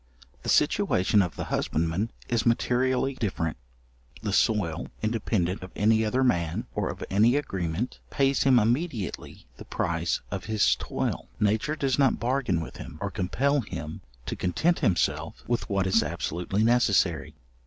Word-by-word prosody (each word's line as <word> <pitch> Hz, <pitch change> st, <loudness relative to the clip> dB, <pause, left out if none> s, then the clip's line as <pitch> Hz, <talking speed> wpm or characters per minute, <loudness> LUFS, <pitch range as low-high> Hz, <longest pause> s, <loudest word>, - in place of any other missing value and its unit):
The -, -, -5 dB
situation 95 Hz, +3 st, +3 dB
of 90 Hz, -4 st, -2 dB
the -, -, -4 dB
husbandman 85 Hz, +7 st, 0 dB, 0.2 s
is 115 Hz, -2 st, +1 dB
materially 125 Hz, +3 st, +1 dB
different. 95 Hz, -9 st, -2 dB, 0.7 s
The 105 Hz, -3 st, -1 dB
soil, 95 Hz, -8 st, +1 dB, 0.2 s
independent 105 Hz, -4 st, 0 dB
of 95 Hz, -, -8 dB
any 110 Hz, +1 st, +3 dB
other 125 Hz, +5 st, +1 dB
man, 85 Hz, -10 st, 0 dB
or -, -, -1 dB
of -, -, -6 dB
any 110 Hz, +6 st, +4 dB
agreement, 95 Hz, -, -2 dB
pays 135 Hz, 0 st, +2 dB
him 135 Hz, -2 st, +5 dB
immediately 120 Hz, -, -1 dB
the -, -, -10 dB
price 85 Hz, 0 st, -1 dB
of -, -, -4 dB
his 110 Hz, -1 st, +3 dB
toil. -, -, -3 dB
Nature 110 Hz, +8 st, +1 dB
does 135 Hz, -3 st, 0 dB
not 135 Hz, -2 st, +3 dB
bargain 120 Hz, -8 st, 0 dB
with 80 Hz, -, -8 dB
him, 75 Hz, -, -9 dB
or 100 Hz, -1 st, -3 dB
compel 130 Hz, +10 st, +1 dB
him 80 Hz, -7 st, -7 dB, 0.2 s
to -, -, -3 dB
content 155 Hz, -, +1 dB
himself 100 Hz, -, 0 dB
with 120 Hz, 0 st, -1 dB
what 100 Hz, -2 st, +1 dB
is 95 Hz, +4 st, +3 dB
absolutely 85 Hz, +5 st, -2 dB
necessary. 100 Hz, -9 st, +2 dB
105 Hz, 150 wpm, -27 LUFS, 90-125 Hz, 0.7 s, him